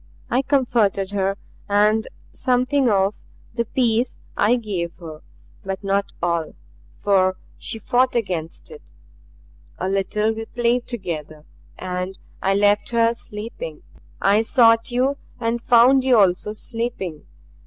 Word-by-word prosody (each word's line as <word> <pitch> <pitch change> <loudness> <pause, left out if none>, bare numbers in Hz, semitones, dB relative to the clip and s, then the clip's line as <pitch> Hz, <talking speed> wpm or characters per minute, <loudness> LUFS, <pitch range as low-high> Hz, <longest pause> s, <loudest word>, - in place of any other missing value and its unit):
I 250 - +3
comforted 235 -8 +1
her, 195 0 0 0.3
and 210 +2 +3 0.3
something 255 +1 +2
of 195 0 +2 0.4
the 235 0 -1
peace 235 0 0 0.2
I 220 +4 +3
gave 190 -8 -3
her; 160 -3 -9 0.4
but 195 +1 -5
not 200 0 0
all, 170 -2 -1 0.4
for 185 -2 +2 0.2
she - - -3
fought 250 +4 +1
against 180 - -3
it. 460 -1 -11 1.0
A 185 - -2
little 200 +3 0
we 225 0 -6
played 240 +1 0
together, 155 - -5 0.3
and 185 +1 -4 0.2
I 195 +1 +2
left 205 +1 +3
her 230 -1 +3
sleeping. 235 - -7 0.4
I 200 +2 +4
sought 230 0 +4
you 260 +3 +1 0.2
and 230 0 -1
found 250 +3 +5
you 255 -2 +4
also 195 +1 +2
sleeping. 220 -8 -5
215 Hz, 125 wpm, -22 LUFS, 195-240 Hz, 1.0 s, found